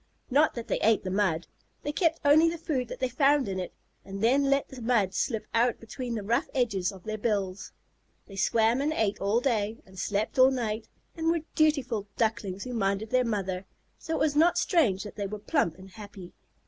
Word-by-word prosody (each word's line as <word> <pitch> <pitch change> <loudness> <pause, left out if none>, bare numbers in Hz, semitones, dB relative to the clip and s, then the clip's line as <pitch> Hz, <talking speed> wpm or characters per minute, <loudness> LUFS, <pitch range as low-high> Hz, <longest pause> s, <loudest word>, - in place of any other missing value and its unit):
Not 295 +4 +3
that 235 -2 -6
they - - -1
ate 220 0 +3
the 185 - -3
mud. 185 -4 +1 0.4
They 295 - -2
kept 330 +1 +1
only 310 +3 +6
the 340 - -4
food 290 -7 -2
that - - -7
they 260 - +1
found 275 +1 +3
in 190 -1 -3
it, 180 - -5 0.3
and 195 0 -7
then 270 +5 +4
let 275 0 +2
the 260 -2 -10
mud 225 -5 +1
slip 225 -1 -1
out 235 +1 +2
between 235 +2 -5
the 215 - -4
rough 235 - 0
edges 200 -8 0
of 190 -3 -13
their 215 0 -4
bills. 200 -4 -2 0.5
They 195 - -12
swam 225 +5 +2
and 300 +2 0
ate 215 -7 -1
all 200 +4 +2
day, 220 -4 0
and 190 -1 -13
slept 210 +6 -1
all 260 +1 +8
night, 230 -4 -2 0.3
and 325 -1 -3
were 335 -1 +1
dutiful 275 -10 +1
Ducklings 215 -4 -1
who 250 - -6
minded 200 0 -1
their 255 0 +3
mother, 195 -4 -3 0.3
so 325 - -3
it - - -2
was 300 -2 +1
not 330 +4 +4
strange 225 - +2
that 210 - -10
they 200 -1 -2
were 210 +2 -5
plump 205 - 0
and 190 0 -13
happy. 200 -3 -11
225 Hz, 210 wpm, -28 LUFS, 200-270 Hz, 0.5 s, all